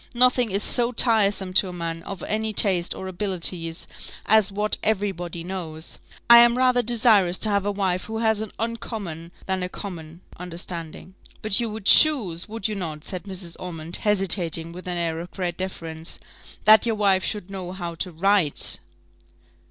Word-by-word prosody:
Nothing 250 -1 +3
is 200 +1 -1
so 240 -1 +2
tiresome 205 -6 +3
to 190 +1 +4
a - - -8
man 165 -1 -5
of 195 +1 -8
any 220 0 -2
taste 185 -4 +2
or 190 - -7
abilities 180 -3 -2 0.4
as 215 -1 +4
what 210 +2 -1
every 205 -2 +1
body 175 -2 -7
knows. 170 -3 -7 0.3
I 235 0 +10
am 240 +1 +5
rather 255 -1 +3
desirous 215 -6 +3
to 215 - 0
have 200 -1 0
a - - +1
wife 190 -2 -1
who 220 - -5
has 220 -1 +1
an 220 - -6
uncommon 210 -7 -5
than 190 -1 -2
a 180 - -3
common 170 -4 -8 0.2
understanding." 175 0 -7 0.3
"But 215 -2 +3
you 235 -1 -1
would 215 -2 -8
choose, 215 - +5
would 225 -2 -2
not 170 -8 -5
you," - - -9
said 185 -1 -5
Mrs. 185 -3 -6
Ormond, 170 -2 -4
hesitating 175 -5 0
with 180 +2 -10
an 180 -1 -2
air 165 -1 -2
of 175 +1 -7
great 180 -3 -4
deference, 165 -3 -6 0.5
"that 215 +1 +7
your 225 - +1
wife 195 -3 +2
should 205 -3 -3
know 185 -2 -6
how 175 -2 -5
to 180 +2 -4
write?" 180 -2 +1
190 Hz, 175 wpm, -23 LUFS, 175-215 Hz, 0.5 s, I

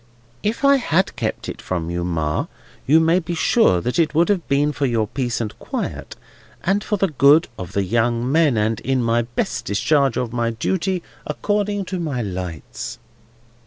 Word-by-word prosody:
"If 225 +6 -1
I 280 0 +6
had 190 -7 +1
kept - - -3
it - - -6
from 85 -2 -3
you, 85 0 -2
Ma, 80 -3 -1 0.4
you 155 +4 +6
may 165 +2 +3
be 170 0 -4
sure 160 - +3
it 155 +5 +1
would 170 +4 +3
have 195 -4 0
been 145 +2 +2
for 145 -1 -1
your 115 -3 +1
peace 120 +1 -2
and 110 -3 -4
quiet, - - -5 0.5
and 200 +3 +1
for 210 - -1
the 195 -1 +1
good 145 +3 +5
of 95 0 -7
the 100 - +1
young 120 +4 0
men, 155 -6 +3
and 110 +1 +1
in 130 -2 0
my 115 0 +2
best 120 +1 -3
discharge 135 +5 +2
of 125 -2 -2
my 120 -1 0
duty 180 - -1 0.2
according 205 +5 -1
to 185 0 -4
my 140 -8 -2
lights." 90 -5 -6
135 Hz, 180 wpm, -21 LUFS, 115-170 Hz, 0.5 s, I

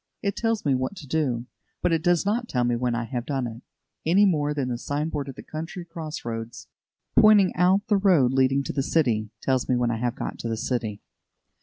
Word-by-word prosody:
It 200 -1 0
tells 225 -4 -1
me 140 - +3
what 130 +9 -1
to 170 - -10
do, 130 -5 -1 0.4
but 180 - +2
it 165 - +1
does 175 +1 +2
not 230 +4 0
tell 125 -2 +1
me 120 0 +1
when 120 0 0
I 120 - -1
have 120 0 -4
done 135 -1 -2
it, 115 0 -7 0.4
any 190 +6 +4
more 150 -6 +1
than 140 -3 -1
the 120 -1 -3
sign 145 +4 -2
board 145 -3 -4
at 135 - -8
the - - -10
country 165 +3 -6
cross 165 -3 -7
roads, 115 0 -5 0.5
pointing 210 -3 +6
out 185 +3 +3
the 210 -2 +3
road 170 -11 +4
leading 135 +1 +3
to - - -4
the 135 - 0
city, 120 -8 +1
tells 130 -2 0
me 130 - +3
when 120 -1 +1
I 115 - -1
have 120 +1 -1
got - - -5
to 115 - -4
the 115 - -2
city. 115 -3 -3
140 Hz, 230 wpm, -25 LUFS, 120-175 Hz, 0.5 s, pointing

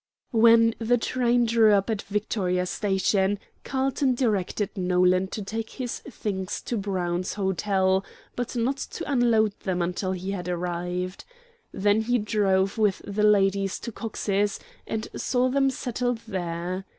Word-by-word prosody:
When 230 0 +6
the 235 +2 +2
train 245 0 +1
drew 225 -2 +5
up 195 -1 +2
at 220 -3 -1
Victoria 195 -3 -1
Station, 195 +1 +1 0.3
Carlton 270 0 0
directed 210 -4 0
Nolan 180 0 +2
to 210 +2 -5
take 225 +3 -4
his 250 -3 -3
things 200 -7 -4
to 240 - -3
Brown's 185 -3 -2
Hotel, 190 -1 +1 0.3
but 245 +1 -3
not 245 +4 0
to - - -6
unload 230 -5 +3
them 185 -2 -2
until 180 +2 -1
he 185 +1 -4
had 180 -2 -4
arrived. 180 +1 -3 0.5
Then 205 +2 +2
he 245 +2 +1
drove 200 -2 +1
with 205 -3 +2
the 205 +1 -2
ladies 195 -2 +3
to 235 - -6
Cox's, 205 -2 -1 0.3
and 220 0 -3
saw 255 0 +1
them 270 +1 +3
settled 245 -2 -2
there. 180 0 -3
205 Hz, 140 wpm, -26 LUFS, 190-230 Hz, 0.5 s, When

